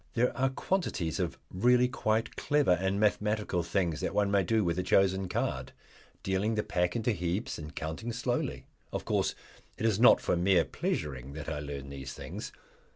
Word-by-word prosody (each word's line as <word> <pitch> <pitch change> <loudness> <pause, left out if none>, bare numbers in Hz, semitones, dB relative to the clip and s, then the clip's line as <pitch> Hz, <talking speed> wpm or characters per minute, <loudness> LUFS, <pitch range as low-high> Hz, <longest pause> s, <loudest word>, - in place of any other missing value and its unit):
There 125 +1 +2
are 135 +1 +2
quantities 130 - -1
of - - -2 0.2
really 125 +6 +4
quite 115 -2 -1
clever 145 -7 +2
and 95 +3 +1
mathematical 105 -3 +1
things 85 -2 0
that - - -2
one 100 -1 +2
may 100 -1 +4
do 110 +4 +2
with 85 0 0
a - - +2
chosen 95 0 +2
card, - - -2 0.5
dealing 95 +4 0
the 105 - 0
pack 90 -4 0
into 115 +1 +1
heaps 90 +2 -2
and 75 0 -8
counting 80 +9 -4
slowly. 120 +1 -2 0.3
Of - - -4
course - - +1 0.4
it 110 - -2
is 110 -2 +2
not 120 - +8
for - - 0
mere 90 0 +3
pleasuring 70 -2 -3
that 75 0 -6
I 75 - -3
learn 70 -1 -6
these 65 -1 -6
things. - - -7
95 Hz, 180 wpm, -30 LUFS, 85-110 Hz, 0.5 s, not